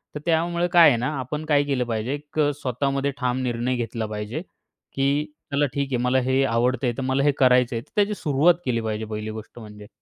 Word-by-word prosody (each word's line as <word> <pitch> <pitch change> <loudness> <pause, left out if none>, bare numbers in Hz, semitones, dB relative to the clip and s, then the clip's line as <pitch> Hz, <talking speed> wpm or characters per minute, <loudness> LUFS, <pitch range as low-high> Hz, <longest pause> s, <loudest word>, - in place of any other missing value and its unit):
तर - - -3
त्यामुळे 170 +1 +1
काय 175 -2 +8
आहे 120 - +2
ना, 125 +5 -1
आपण 150 +5 -4
काय 145 -2 +3
केलं 135 -3 0
पाहिजे, 115 +3 -2
एक 145 +1 -6 0.2
स्वतःमध्ये 135 +2 -1
ठाम 125 -1 -1
निर्णय 120 +1 -1
घेतला 115 -2 -3
पाहिजे, 105 +7 -5 0.5
की 140 +2 +1 0.3
चला 145 +1 +3
ठीक 140 -1 -1
आहे. - - +2
मला 125 +1 +3
हे 135 +1 +3
आवडतंय, 125 +1 +1
तर - - -2
मला 130 +1 0
हे 145 - +4
करायचंय 125 -2 +3
तर - - -23
त्याची 205 0 +2
सुरुवात 160 +1 +3
केली 115 -3 0
पाहिजे 110 0 -3
पहिली 110 0 -5
गोष्ट 110 +2 -10
म्हणजे. 105 -2 -11
130 Hz, 205 wpm, -24 LUFS, 115-145 Hz, 0.5 s, काय